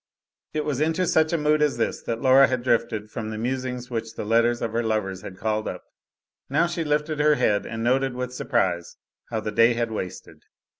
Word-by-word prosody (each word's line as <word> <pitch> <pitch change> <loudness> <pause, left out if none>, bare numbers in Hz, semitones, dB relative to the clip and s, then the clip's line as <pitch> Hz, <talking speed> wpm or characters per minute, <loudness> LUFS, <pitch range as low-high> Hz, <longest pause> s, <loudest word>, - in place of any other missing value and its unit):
It 155 - -1
was 145 -2 -1
into 160 +4 +1
such 160 -2 +3
a 170 - +2
mood 150 0 +2
as 150 -4 +2
this 115 - -1
that 115 +1 -4
Laura 135 +1 +7
had 130 -2 -2
drifted 110 -3 0
from 110 -2 -4
the 110 - -5
musings 125 +1 -3
which 115 -1 -4
the - - -5
letters 115 +2 +3
of 115 - -2
her 115 +1 0
lovers 105 -4 -1
had 95 -2 -9
called 110 0 -1
up. - - -5 0.7
Now 150 +5 +3
she 170 -1 -2
lifted 150 0 -1
her 150 0 +4
head 105 -6 +1
and 115 0 -4
noted 130 +1 +1
with 125 0 -4
surprise 90 -10 -1 0.3
how 110 -2 -2
the 105 - -3
day 115 +3 +5
had 115 -1 -1
wasted. 95 -4 -7
120 Hz, 210 wpm, -24 LUFS, 110-140 Hz, 0.7 s, Laura